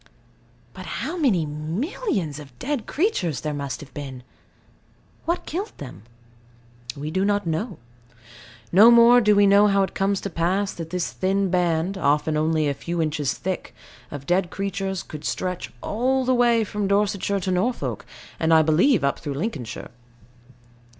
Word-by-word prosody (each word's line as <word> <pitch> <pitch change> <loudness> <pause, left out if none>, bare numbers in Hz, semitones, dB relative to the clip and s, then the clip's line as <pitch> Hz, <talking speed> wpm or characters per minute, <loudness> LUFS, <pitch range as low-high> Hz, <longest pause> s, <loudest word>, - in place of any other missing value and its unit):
But - - -9 0.2
how 330 - -3
many 235 - +2
millions 160 - -3
of 135 -4 -13
dead 275 - -3
creatures, 190 - 0
there 150 -1 -3
must 140 -4 -4
have 140 -2 -12
been! 135 -3 -7 1.0
What 340 +2 -1
killed 390 +7 -4
them? 115 -8 -10 0.9
We 150 +2 -4
do 190 +3 0
not 205 0 +1
know. 165 +8 -2 0.9
No 210 +6 +8
more 240 +1 +7
do 210 -2 +4
we 205 0 +5
know 200 +1 +6
how 200 -1 +3
it 190 - -3
comes 195 0 0
to 200 - -4
pass 185 +5 0
that 165 -1 -7
this 180 0 -2
thin 190 0 0
band 180 +1 0
(often 150 +1 +1
only 155 0 +1
a 140 - +1
few 170 +5 -4
inches 150 -3 0
thick) 185 0 -5 0.3
of 140 -1 -8
dead 175 +2 +1
creatures 195 -1 -3
should 150 -2 -7
stretch 180 -1 -3
all 255 +4 0
the 255 - +3
way 240 -2 +3
from 210 -1 -3
Dorsetshire 200 0 +1
to 185 - -1
Norfolk, 220 +7 -1 0.4
and, 160 0 +1
I 160 -1 +6
believe, 175 - +3
up 140 - 0
through 145 -3 -5
Lincolnshire. 145 - -5
185 Hz, 160 wpm, -23 LUFS, 155-210 Hz, 1.0 s, No